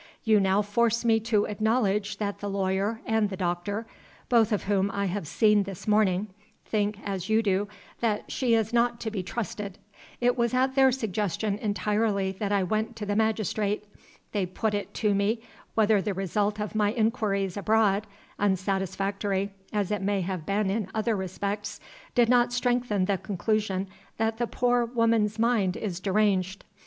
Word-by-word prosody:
You 220 -3 +4
now 195 +1 +3
force 235 +3 +1
me 225 -1 +4
to 220 -2 +1
acknowledge 210 -1 0
that 205 -1 -3
the 205 - -4
lawyer 195 +3 -1
and 220 -2 +1
the 190 - -5
doctor 185 +4 -2 0.4
(both 230 -2 +4
of 210 - 0
whom 200 -1 +1
I 200 0 -1
have 190 -3 -3
seen 210 +5 +4
this 195 -1 -7
morning) 210 -1 +2 0.4
think, 210 -1 0
as 195 -2 -4
you 220 +1 +3
do, 200 0 +1 0.3
that 215 -3 -1
she 245 -3 +2
is 225 0 0
not 235 0 +2
to 220 - -3
be 205 -3 -2
trusted. 200 0 -5 0.4
It 245 0 +3
was 235 0 +1
at 260 +1 +2
their 265 -1 +5
suggestion 210 -3 -1
entirely 205 -1 0
that 205 -2 -1
I 200 -2 +2
went 215 +5 -1
to 215 - -5
the 205 0 -1
magistrate. 215 -1 0 0.5
They 200 -4 0
put 210 +4 -2
it 205 -1 -3
to 210 -2 +2
me 210 +3 0 0.3
whether 215 -2 +4
the 205 -1 -2
result 205 +3 -1
of 210 0 -3
my 210 -1 +2
inquiries 215 -5 0
abroad 210 0 +2 0.3
unsatisfactory 195 0 0 0.2
as 205 -2 -1
it 210 -2 -1
may 200 0 0
have 180 -3 -4
been 200 0 +1
in 205 -2 -2
other 220 +1 +1
respects 200 +2 -4 0.4
did 240 -2 +5
not 245 0 +4
strengthen 245 -5 +1
the 195 -1 0
conclusion 200 -1 -1 0.3
that 225 0 0
the 240 - 0
poor 245 0 +2
woman's 230 -3 +1
mind 220 -5 +2
is 185 -5 -4
deranged. 195 -1 +1
210 Hz, 170 wpm, -27 LUFS, 195-225 Hz, 0.5 s, their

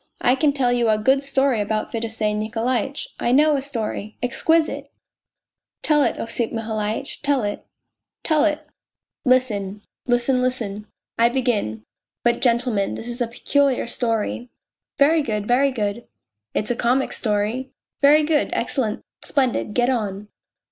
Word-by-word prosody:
I 245 - +5
can 285 +2 +2
tell 265 -3 +1
you 240 -2 +2
a 215 - +3
good 265 +6 +3
story 275 -4 +1
about 215 +1 -2
Fedosey 225 -2 -1
Nikolaitch! 230 +6 -2
I 240 - 0
know 300 +3 +5
a 275 - -1
story 220 -5 -4
exquisite! 320 +6 +1 0.3
" - - -67
" - - -58
Tell 300 -1 +3
it, - - +1
Osip 230 0 -2
Mihalitch, 220 +2 -3
tell 285 -4 +1
it." 205 0 -3 0.3
" - - -64
Tell 310 -3 +2
it." 305 -1 0 0.3
" - - -55
Listen." 205 -5 -1
" - - -70
Listen, 245 +1 +2
listen." 220 -5 -2 0.2
" - - -27
I 235 0 +5
begin; 230 - -1 0.4
but, 240 0 +2
gentlemen, 235 -4 +1
this 230 - -7
is 240 +1 -5
a 240 - +1
peculiar 275 +3 +1
story... 235 0 -1 0.2
." - - -70
" - - -70
Very 310 +3 +4
good, 210 -6 -2
very 265 +3 +4
good." 220 -2 -3 0.2
" 105 0 -62
It's 215 - 0
a - - 0
comic 250 +3 +1
story." 220 +4 -1 0.2
" - - -54
Very 295 +2 +6
good, 300 -1 +1
excellent, 230 -2 -1 0.2
splendid. 255 -6 0
Get 245 +1 +3
on 210 -4 -3
240 Hz, 170 wpm, -22 LUFS, 215-270 Hz, 0.4 s, Very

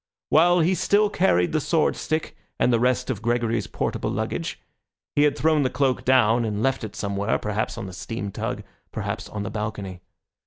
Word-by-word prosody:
While 175 +2 +5
he 175 +4 +3
still 205 +3 +2
carried 90 - +2
the 155 - +1
sword 160 +2 +1
stick 155 +1 -3 0.2
and 125 - +3
the 115 - +3
rest 125 +1 +1
of 110 -5 -4
Gregory's 115 -2 0
portable - - -2
luggage, - - -3 0.6
he 145 - +4
had 150 -1 +3
thrown 155 0 +3
the 130 - +1
cloak 135 -1 0
down 120 -2 +4
and 105 -1 -2
left 135 -2 +1
it 110 - -6
somewhere, 100 +1 -1
perhaps 105 +2 -2
on 115 - -5
the 95 - -8
steam 100 +2 -5
tug, - - -4 0.3
perhaps 110 +1 -4
on 105 -1 -4
the 100 - -5
balcony. 105 -4 -5
120 Hz, 190 wpm, -24 LUFS, 105-145 Hz, 0.6 s, While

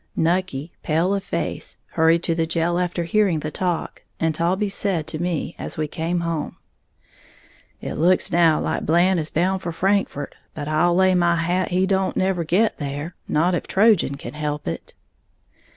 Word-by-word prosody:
Nucky, 165 -3 0
pale 165 +5 +1
of 200 -1 -1
face, - - -4
hurried 165 +1 +3
to 165 - +1
the 165 0 0
jail 170 +1 0
after 175 -1 -1
hearing 180 -2 +2
the 155 - -4
talk, 180 -1 -2 0.2
and 160 -1 +1
Taulbee 185 +6 0
said 190 -6 -1
to 155 - -5
me 175 -2 -2
as - - -5
we 155 -1 -1
came 170 +3 -2
home, 165 -3 -3 1.2
"It - - -4
looks 175 +4 +2
now 165 -2 +4
like - - -2
Blant 175 +3 +3
is 155 -1 -3
bound 185 +3 0
for 175 - -3
Frankfort; 190 -5 0 0.2
but 145 -1 -5
I'll 155 +3 +2
lay 185 0 +4
my 175 -1 +3
hat 175 +3 0
he 185 +1 +2
don't 190 0 0
never 185 -2 +1
get 185 +7 +1
there, 145 +3 -4
not 170 +4 +2
if 175 - -2
Trojan 200 -8 +3
can 120 -2 -8
help 150 -1 -3
it." 80 - -5
170 Hz, 175 wpm, -22 LUFS, 160-185 Hz, 1.2 s, now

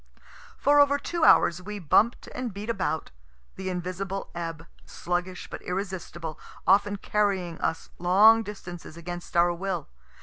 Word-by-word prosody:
For 290 +1 +4
over 285 0 +5
two 340 +3 -3
hours 175 - +5
we 210 +3 -6
bump'd 205 +6 +2
and 250 -2 -4
beat 205 +4 -4
about, 185 -6 -2 0.4
the 190 0 -4
invisible 185 +2 -4
ebb, 165 -1 -5 0.2
sluggish 180 +1 -3
but - - -8
irresistible, 180 -4 -5 0.3
often 205 +1 +4
carrying 195 -5 -1
us 165 - -2
long 205 +6 +6
distances 175 -6 -8
against 175 +1 -6
our 175 0 +5
will. 180 -2 -3
185 Hz, 135 wpm, -27 LUFS, 175-205 Hz, 0.4 s, long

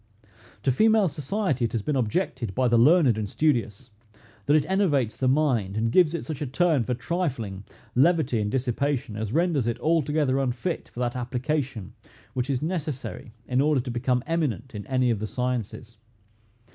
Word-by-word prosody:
To 135 - +3
female 215 - +4
society 150 - -2
it 115 - -4
has 115 -3 -1
been 150 - -1
objected 125 - -1
by 130 0 +2
the 120 0 +3
learned 135 - +5
and 105 -2 -3
studious, 120 -6 -1 0.6
that 145 - +5
it 155 - +3
enervates 150 - +1
the 130 - -1
mind, 125 -8 +1
and 115 +1 0
gives 170 +1 +4
it 165 - -4
such 155 -3 -6
a 145 - -2
turn 155 0 +2
for 125 +2 -2
trifling, 120 - -3 0.3
levity, 140 -4 +3
and 105 - -1
dissipation, 130 0 -1
as 110 -1 -3
renders 160 -5 +1
it 120 - -2
altogether 150 -4 +1
unfit 135 +6 -2
for 120 - -7
that 120 0 -1
application 125 - -3 0.4
which 125 +2 -2
is 135 0 -1
necessary 155 -8 -4 0.2
in 125 +1 +2
order 150 -1 +3
to 125 0 -4
become 125 +1 0
eminent 135 - -2
in 105 -2 -7
any 130 -2 +2
of 110 - -1
the 110 - -3
sciences. 120 -1 -4
130 Hz, 175 wpm, -25 LUFS, 120-155 Hz, 0.6 s, learned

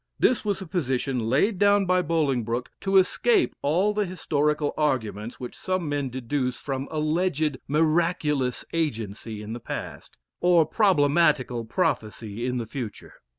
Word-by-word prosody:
This 255 - +2
was 200 -2 -1
a - - -9
position 130 - -1
laid 180 - +2
down 205 -1 +4
by 185 0 +3
Bolingbroke 130 -8 -1
to 195 0 +2
escape 375 - +3
all 180 +9 +2
the 210 0 +1
historical 150 -4 0
arguments 115 -7 -1
which 125 - -7
some 185 -3 -2
men 145 -2 -1
deduce 125 +1 -2
from 135 -1 -4
alleged 155 -2 0
miraculous 155 -3 +1
agency 110 -8 -3
in 110 +2 -6
the 120 - -5
past, - - -7 0.2
or 175 -2 +4
problematical 150 - +2
prophecy 110 0 -2
in 125 0 -1
the 120 - -3
future. 115 -3 -7
145 Hz, 140 wpm, -25 LUFS, 125-175 Hz, 0.2 s, down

